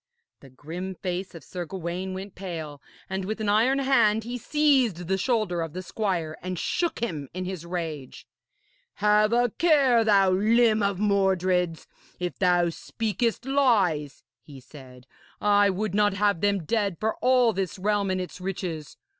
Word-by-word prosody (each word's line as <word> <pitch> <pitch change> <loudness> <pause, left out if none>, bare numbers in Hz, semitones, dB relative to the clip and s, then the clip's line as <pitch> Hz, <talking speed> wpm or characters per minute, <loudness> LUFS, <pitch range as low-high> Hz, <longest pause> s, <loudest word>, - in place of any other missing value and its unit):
The 135 - -15
grim 170 +8 -7
face 185 0 -4
of 165 - -10
Sir 180 -1 -6
Gawaine 185 +2 -4
went 195 +1 -7
pale, 160 -6 -7 0.3
and 190 0 -3
with 215 +4 -4
an 215 -1 -1
iron 230 +6 +3
hand 235 -6 +3
he 240 +2 -5
seized 255 - +1
the 190 - +1
shoulder 215 -6 0
of 165 -2 -5
the 185 +1 -5
squire 180 -6 -3
and 185 0 -4
shook 345 - -1
him 155 - -4
in 185 0 -3
his 180 -3 -6
rage. 160 -6 -5 0.7
'Have 210 +1 +3
a 240 0 +2
care, 275 -8 +4
thou 200 -3 +4
limb 220 +3 +3
of 200 -2 0
Mordred's, 185 -4 +1 0.3
if 180 -1 -4
thou 175 -2 +3
speakest 230 +6 -2
lies,' 205 - +1 0.2
he 140 +2 -13
said. 130 -2 -14 0.3
'I 205 -1 +4
would 200 +1 -2
not 205 -1 +2
have 200 -3 +1
them 200 -3 +1
dead 200 -3 0
for 220 0 -1
all 250 -2 +3
this 190 0 -3
realm 205 +1 0
and 185 0 0
its 180 0 -7
riches. 175 -5 -5
195 Hz, 165 wpm, -26 LUFS, 175-215 Hz, 0.7 s, care